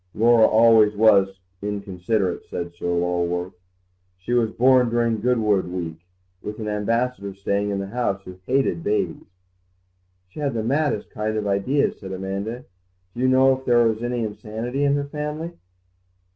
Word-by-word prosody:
"Laura 115 0 +5
always 110 -1 +5
was 100 -3 +4 0.2
inconsiderate," 100 -1 -2
said 85 0 -5
Sir 85 - -6
Lulworth; 90 +1 -1 0.6
"she 90 +7 -4
was 120 -2 +2
born 125 +1 +4
during 115 -2 0
Goodwood 110 -6 +1
week, 85 -3 -5 0.4
with 105 +1 -6
an 110 - -4
Ambassador 105 0 -1
staying 100 +1 -1
in 100 - -1
the 100 - -3
house 100 -2 -2
who 90 -1 -11
hated 130 -11 +1
babies." 105 +1 -1 1.0
"She 95 - -12
had 140 -4 -1
the 110 - -1
maddest 145 +5 0
kind 110 -2 -2
of 105 - -2
ideas," 100 +9 0
said 95 -1 -7
Amanda; 100 +6 -4 0.5
"do 120 - -5
you 130 - +3
know 130 +1 +5
if 130 - -11
there 120 -2 +4
was 110 0 -1
any 120 -1 -2
insanity 110 +5 -4
in 140 0 +3
her 145 0 -1
family?" 150 +3 -5
110 Hz, 160 wpm, -23 LUFS, 100-125 Hz, 1.0 s, Laura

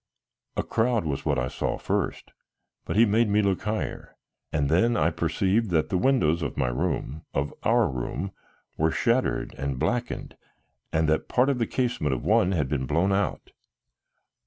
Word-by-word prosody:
A - - +1
crowd 115 -3 +1
was 70 -3 -3
what 75 -3 +1
I 65 0 0
saw - - -2
first, - - -2 0.5
but - - -3
he 115 +3 +6
made 110 +1 +2
me 105 +1 +3
look 100 -2 +1
higher, 110 0 -4 0.4
and 75 -3 +1
then 115 +10 +3
I - - +2
perceived 105 +3 0
that 80 -3 +1
the 95 - +1
windows 85 - +2
of - - -3
my 65 - +1
room, 65 +4 -2
of 70 +1 -1
our 115 0 +3
room, 70 +8 -4 0.5
were 80 +1 +3
shattered 120 +8 0
and 70 -1 -2
blackened 120 - -2 0.6
and 80 0 +1
that 80 0 +1
part 125 +2 +3
of 130 - -2
the 115 - +1
casement 120 - 0
of - - -6
one 90 - +3
had 75 -7 0
been 65 -2 -2
blown 85 +8 +2
out. 100 +1 -1
90 Hz, 175 wpm, -26 LUFS, 75-115 Hz, 0.6 s, he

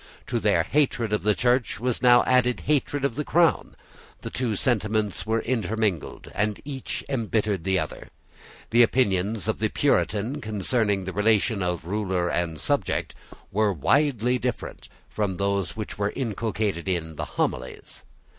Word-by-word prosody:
To - - -1
their - - +3
hatred 125 -7 +1
of 105 - +1
the 105 0 +2
Church 120 +5 +1
was 125 0 -1
now 125 -1 +6
added 125 -1 +2
hatred 145 -1 0
of 140 - 0
the 150 +5 -2
Crown. 170 +2 +2 0.5
The - - -6
two 120 -4 -1
sentiments 110 -3 0
were 110 0 +1
intermingled; 110 - -2
and 105 0 -1
each 135 -3 -5
embittered 110 -7 -1
the 95 -1 +2
other. - - -4 0.6
The 120 +1 +6
opinions 105 -4 +2
of - - -1
the - - +1
Puritan 110 +8 0
concerning 105 -1 0
the 95 0 -5
relation 105 +1 +2
of 90 -2 -2
ruler 95 -2 -1
and 85 -3 -1
subject - - -1 0.4
were 105 +1 +2
widely 125 - +2
different 125 -1 -4 0.2
from 100 -4 -2
those 100 -3 -1
which 110 -2 -6
were 100 0 0
inculcated 110 -6 -2
in 80 -3 -2
the - - -3
Homilies. 65 0 -3
110 Hz, 150 wpm, -25 LUFS, 95-125 Hz, 0.6 s, now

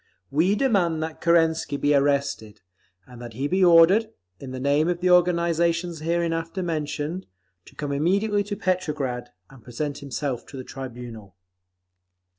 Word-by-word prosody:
We 170 +8 +2
demand 185 -11 +1
that 160 0 -6
Kerensky 165 -3 +2
be 145 +1 +2
arrested, 140 -6 0 0.4
and 125 -1 -13
that 120 -1 -8
he 135 +5 -2
be 185 +4 +1
ordered, 180 +6 +6 0.3
in 135 - -8
the 130 0 -6
name 145 +5 +2
of 175 -1 -1
the 180 0 +2
organisations 170 -1 +2
hereinafter 165 +2 -1
mentioned, 160 +1 -3 0.4
to - - -17
come 145 -1 -4
immediately 200 +8 +1
to 205 0 -4
Petrograd 150 -10 -2 0.2
and 135 -4 -16
present 140 +4 -4
himself 140 -2 -4
to 140 - -10
the 130 - -6
tribunal. 120 -7 -9
160 Hz, 145 wpm, -24 LUFS, 140-175 Hz, 0.4 s, ordered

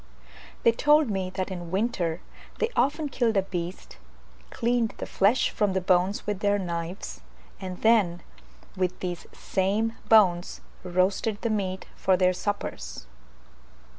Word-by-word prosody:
They 230 - +6
told 295 +2 +4
me 190 -2 -2
that 190 0 -4
in 175 -2 -6
winter 185 -4 -1 0.4
they 460 - 0
often 295 +2 +1
killed 240 -5 +1
a 195 - +3
beast, 180 - -6 0.5
cleaned 235 -1 0
the - - -4
flesh 210 +7 +2
from 205 -3 +1
the 190 - +1
bones 185 +2 +1
with 210 -2 -2
their 205 0 +2
knives, 170 - -5 0.4
and 185 -1 -6
then 205 -7 +3 0.5
with 185 -1 -1
these 175 -2 -5
same 205 +4 0 0.2
bones 185 -5 +4 0.2
roasted 185 +4 0
the 230 - +1
meat 190 -3 -2
for 190 -1 +2
their 185 0 +3
suppers. 70 - -4
190 Hz, 135 wpm, -26 LUFS, 180-220 Hz, 0.5 s, They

